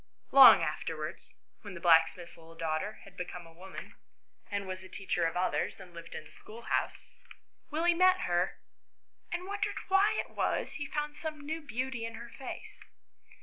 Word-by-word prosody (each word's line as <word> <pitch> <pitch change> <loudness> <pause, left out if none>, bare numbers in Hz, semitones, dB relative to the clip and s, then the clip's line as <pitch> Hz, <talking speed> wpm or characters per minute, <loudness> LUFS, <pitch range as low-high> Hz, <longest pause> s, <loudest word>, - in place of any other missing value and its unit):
Long 255 -10 +10
afterwards, 155 0 -4 0.3
when 200 -3 -8
the - - -7
blacksmith's 170 0 +4
little 165 0 -15
daughter 165 +5 -2
had 195 -2 -15
become 180 -1 -6
a 165 - -15
woman, 190 +3 -10 0.6
and 200 -1 -2
was 185 0 -5
a 185 - -12
teacher 185 -3 -1
of 165 - -3
others, 185 +2 0
and 180 -2 -12
lived 170 0 -9
in - - -6
a 150 - -15
schoolhouse, 230 +2 -4 0.6
Willie 330 +3 +3
met 370 +1 +5
her 175 +1 0 0.7
and 355 +1 -3
wondered 410 +2 -2
why 390 +2 +5
it - - -4
was - - -1
he 290 - -5
found 295 0 -3
some 305 -1 -6
new 320 +2 -3
beauty 260 -3 -3
in 230 0 -5
her 235 +1 -9
face. 265 - -8
200 Hz, 170 wpm, -31 LUFS, -, 0.7 s, Long